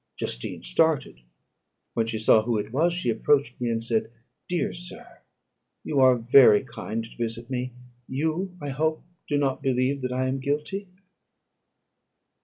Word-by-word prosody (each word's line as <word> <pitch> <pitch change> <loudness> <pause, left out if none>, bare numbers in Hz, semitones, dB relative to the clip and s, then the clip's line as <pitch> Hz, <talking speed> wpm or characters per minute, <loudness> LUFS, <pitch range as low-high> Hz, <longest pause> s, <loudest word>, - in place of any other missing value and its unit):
Justine - - -5
started. 150 - +1 0.7
When 115 -1 0
she 115 -1 -2
saw 110 0 +5
who 115 0 0
it 105 +1 -4
was, 165 +6 +3
she 175 -8 -1
approached 125 +2 +1
me, 120 - 0
and 115 0 -1
said, 115 -1 0 0.4
"Dear 175 -1 -1
sir, 175 0 -11 0.6
you 145 - 0
are 130 -1 +6
very 120 -2 +6
kind 115 +1 -5
to 115 - -13
visit 115 +1 -4
me; 125 -1 -3 0.3
you, 160 +7 -2
I 145 - -5
hope, 155 +3 -1 0.2
do 145 - +1
not 135 -2 0
believe 135 +1 0
that 125 0 -2
I 130 +1 0
am 135 +1 -1
guilty?" 150 +9 -2
130 Hz, 155 wpm, -26 LUFS, 115-150 Hz, 0.7 s, are